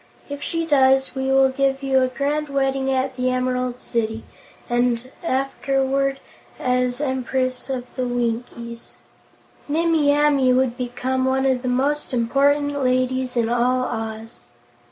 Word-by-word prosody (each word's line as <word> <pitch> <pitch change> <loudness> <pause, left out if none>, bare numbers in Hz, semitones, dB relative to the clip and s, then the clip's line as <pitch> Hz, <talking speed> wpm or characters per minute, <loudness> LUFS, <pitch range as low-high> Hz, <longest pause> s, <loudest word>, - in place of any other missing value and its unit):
If 285 0 -6
she 330 +2 -2
does, 265 -3 +3
we 265 0 -2
will 270 0 +4
give 270 0 0
you 265 -1 +3
a 255 - +3
grand 285 +3 -2
wedding 270 -1 0
at 260 0 0
the 255 0 0
Emerald 255 -1 -1
City 225 -1 -2 0.4
and, 240 +1 0
afterward, 270 -1 0 0.4
as 250 0 0
Empress 260 -2 -2
of 255 -2 -3
the 255 -1 -1
Winkies, 235 -1 -4 0.7
Nimmie 320 -1 +2
Amee 285 -3 +3
would 255 -1 +2
become 255 +1 -2
one 265 +1 +1
of 260 -2 +2
the 255 - -4
most 270 +2 0
important 285 +4 +2
ladies 255 0 0
in 230 -1 +2
all 245 +2 +1
Oz." 225 -1 -5
260 Hz, 135 wpm, -22 LUFS, 250-275 Hz, 0.7 s, will